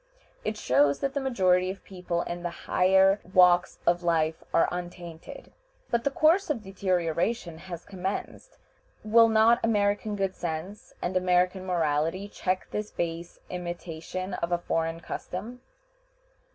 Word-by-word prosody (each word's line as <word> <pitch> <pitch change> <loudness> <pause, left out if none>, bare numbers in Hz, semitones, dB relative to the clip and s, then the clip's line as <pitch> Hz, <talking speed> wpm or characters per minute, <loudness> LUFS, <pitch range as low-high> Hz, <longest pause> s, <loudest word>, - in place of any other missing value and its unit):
It 215 0 -2
shows 140 -2 +3
that 275 -1 -1
the 285 - 0
majority 185 -8 +2
of 195 +1 -7
people 180 -2 -3
in 175 0 -5
the 175 - -2 0.2
higher 190 +2 +4
walks 180 -1 +5
of 175 +1 +3
life 160 -2 0
are - - +4
untainted. 175 -2 -8 0.4
But 235 -1 +1
the - - +4
course 315 +7 +3
of 245 -8 -1
deterioration 180 -1 -1
has 175 -2 -8
commenced. 195 - -5 0.5
Will 225 +1 +6
not 225 +2 +5
American 205 -1 +1
good 195 -2 -1
sense 175 +5 -6
and 180 +1 -2
American 185 +1 +2
morality 165 +2 0
check 185 -2 -2
this 210 0 -3
base 170 0 -4
imitation 175 +1 -5
of 170 -1 -3
a 175 - +3
foreign 165 -1 -2
custom? 215 +9 -6
185 Hz, 140 wpm, -27 LUFS, 170-205 Hz, 0.5 s, Will